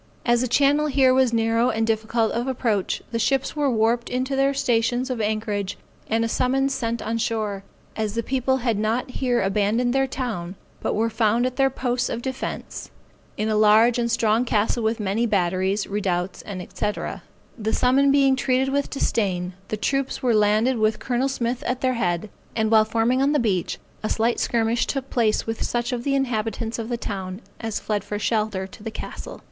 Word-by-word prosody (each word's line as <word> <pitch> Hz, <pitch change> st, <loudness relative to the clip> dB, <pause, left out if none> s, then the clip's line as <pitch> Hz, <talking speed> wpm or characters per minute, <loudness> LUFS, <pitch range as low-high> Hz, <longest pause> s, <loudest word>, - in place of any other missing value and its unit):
As 240 Hz, -1 st, +3 dB
the 255 Hz, -, 0 dB
channel 285 Hz, +4 st, +3 dB
here 265 Hz, -2 st, +4 dB
was 260 Hz, -2 st, +3 dB
narrow 230 Hz, +1 st, +2 dB
and 225 Hz, -1 st, 0 dB
difficult 225 Hz, 0 st, 0 dB
of 240 Hz, +3 st, -2 dB
approach, 230 Hz, -7 st, -1 dB
the 230 Hz, -, -1 dB
ships 270 Hz, +5 st, 0 dB
were 290 Hz, -2 st, +1 dB
warped 235 Hz, 0 st, +1 dB
into 255 Hz, +2 st, -1 dB
their 275 Hz, +1 st, +3 dB
stations 245 Hz, -1 st, +1 dB
of 240 Hz, -3 st, -2 dB
anchorage, 210 Hz, -2 st, -2 dB, 0.3 s
and 225 Hz, +1 st, +2 dB
a -, -, 0 dB
summons 270 Hz, +3 st, +1 dB
sent 230 Hz, -2 st, -2 dB
on 230 Hz, +1 st, -2 dB
shore, 215 Hz, -3 st, -2 dB, 0.3 s
as 215 Hz, -1 st, -2 dB
the 230 Hz, -, 0 dB
people 265 Hz, +1 st, +1 dB
had 225 Hz, -4 st, +1 dB
not 225 Hz, +4 st, -1 dB
here 245 Hz, -4 st, 0 dB
abandoned 210 Hz, +5 st, +1 dB
their 270 Hz, 0 st, +2 dB
town, 220 Hz, -9 st, -4 dB, 0.3 s
but -, -, -1 dB
were 225 Hz, +1 st, +1 dB
found 225 Hz, +2 st, +2 dB
at 255 Hz, 0 st, -3 dB
their 270 Hz, -1 st, +4 dB
posts 250 Hz, -1 st, -1 dB
of 235 Hz, -, -4 dB
defence, 265 Hz, 0 st, -5 dB, 0.5 s
in 215 Hz, -, -1 dB
a 215 Hz, -, +1 dB
large 215 Hz, +3 st, +5 dB
and 235 Hz, 0 st, 0 dB
strong 230 Hz, 0 st, +2 dB
castle 230 Hz, 0 st, +1 dB
with 220 Hz, +1 st, 0 dB
many 210 Hz, +3 st, 0 dB
batteries, 190 Hz, 0 st, +1 dB
redoubts, 190 Hz, -3 st, -2 dB
&c. 200 Hz, +1 st, -3 dB, 0.7 s
The 220 Hz, 0 st, -1 dB
summons 270 Hz, +4 st, +3 dB
being 275 Hz, -1 st, +4 dB
treated 260 Hz, +1 st, +1 dB
with 280 Hz, +1 st, 0 dB
disdain, 185 Hz, -9 st, -1 dB
the 215 Hz, -, -3 dB
troops 275 Hz, +4 st, -1 dB
were 245 Hz, -2 st, +3 dB
landed 215 Hz, +4 st, +3 dB
with 215 Hz, 0 st, +2 dB
Col. 255 Hz, +1 st, -1 dB
Smith 245 Hz, -2 st, -2 dB
at 250 Hz, +1 st, -1 dB
their 255 Hz, -1 st, +2 dB
head; 210 Hz, -4 st, -1 dB, 0.2 s
and 220 Hz, -1 st, +1 dB
while 220 Hz, -1 st, +6 dB
forming 230 Hz, +4 st, +1 dB
on 280 Hz, +2 st, +3 dB
the -, -, +3 dB
beach 200 Hz, -7 st, 0 dB, 0.2 s
a 215 Hz, -, -2 dB
slight 230 Hz, +2 st, +1 dB
skirmish 230 Hz, 0 st, +1 dB
took 270 Hz, -1 st, -3 dB
place 225 Hz, -3 st, +1 dB
with 225 Hz, 0 st, -4 dB
such 240 Hz, 0 st, -1 dB
of 240 Hz, -1 st, -3 dB
the 275 Hz, +1 st, +1 dB
inhabitants 230 Hz, -3 st, -1 dB
of 225 Hz, 0 st, -4 dB
the 240 Hz, -, -1 dB
town, 190 Hz, -3 st, -5 dB, 0.2 s
as 225 Hz, -2 st, -3 dB
fled 210 Hz, -2 st, -2 dB
for 205 Hz, 0 st, -4 dB
shelter 210 Hz, -3 st, 0 dB
to 210 Hz, +4 st, -13 dB
the 225 Hz, -, -4 dB
castle. 220 Hz, -, -8 dB
230 Hz, 195 wpm, -23 LUFS, 215-255 Hz, 0.7 s, while